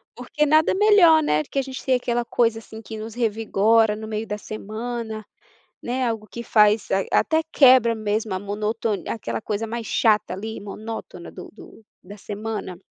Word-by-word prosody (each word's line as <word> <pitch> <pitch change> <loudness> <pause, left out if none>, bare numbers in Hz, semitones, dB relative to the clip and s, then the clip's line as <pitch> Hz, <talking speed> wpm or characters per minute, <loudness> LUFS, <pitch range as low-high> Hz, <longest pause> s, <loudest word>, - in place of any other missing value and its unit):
Porque 300 -2 -1
nada 310 +2 +4
melhor, 380 -6 +6
né, 150 - +1
do - - -23
que 275 - -1
a - - +2
gente 265 -1 -8
tem 260 -1 +3
aquela 240 -1 -1
coisa, 230 -1 +1
assim, 220 0 -11
que 220 +1 -8
nos 220 +1 -7
revigora 220 -1 +2
no 220 0 -8
meio 220 +1 -4
da 210 - -3
semana, 220 +1 -6 0.6
né, 250 +1 -1
algo 220 -2 -3
que 235 - -7
faz 210 -1 +3
a 195 0 +1 0.2
até 320 0 +1
quebra 255 -4 +6
mesmo 215 -1 -2
a - - -1
monotoni 210 +1 -3
aquela 220 - -4
coisa 215 +1 -3
mais 230 0 -5
chata 215 -4 +2
ali 220 +3 -6
monótona 205 -3 -8
do 180 - -11
do 225 - -15 0.2
da 200 +3 -11
semana. 210 -3 -6
220 Hz, 180 wpm, -23 LUFS, 210-240 Hz, 0.6 s, melhor